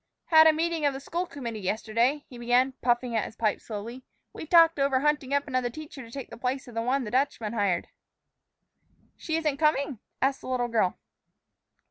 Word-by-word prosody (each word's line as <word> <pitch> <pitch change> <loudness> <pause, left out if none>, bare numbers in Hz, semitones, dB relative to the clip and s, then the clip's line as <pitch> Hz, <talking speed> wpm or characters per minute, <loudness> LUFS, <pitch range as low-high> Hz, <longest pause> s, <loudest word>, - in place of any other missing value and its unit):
"Had 315 -1 +8
a - - +8
meeting 325 0 -1
of 285 -2 +2
the - - -5
school 345 +6 -3
committee 235 -8 -6
yesterday," 230 +8 0
he 245 - -11
began, 245 +2 +3
puffing 240 -1 +1
at 220 - +1
his - - -9
pipe 220 -2 0
slowly. 230 +4 -7 0.3
"We 315 - -8
talked 330 -2 +6
over 275 -1 +2
hunting 295 -2 0
up 285 +1 +1
another 255 -2 0
teacher 300 +1 -9
to 230 - -11
take 270 +2 -8
the - - -10
place 260 +1 -2
of 245 - -11
the 230 - -1
one 260 +3 0
the 210 - -6
Dutchman 245 -4 0
hired." 200 -6 0 1.3
"She 320 - -3
isn't 305 -4 0
coming?" 280 -5 +1 0.2
asked 270 +1 +1
the - - -9
little 245 -2 0
girl. 220 -6 +1
260 Hz, 195 wpm, -27 LUFS, 235-290 Hz, 1.3 s, Had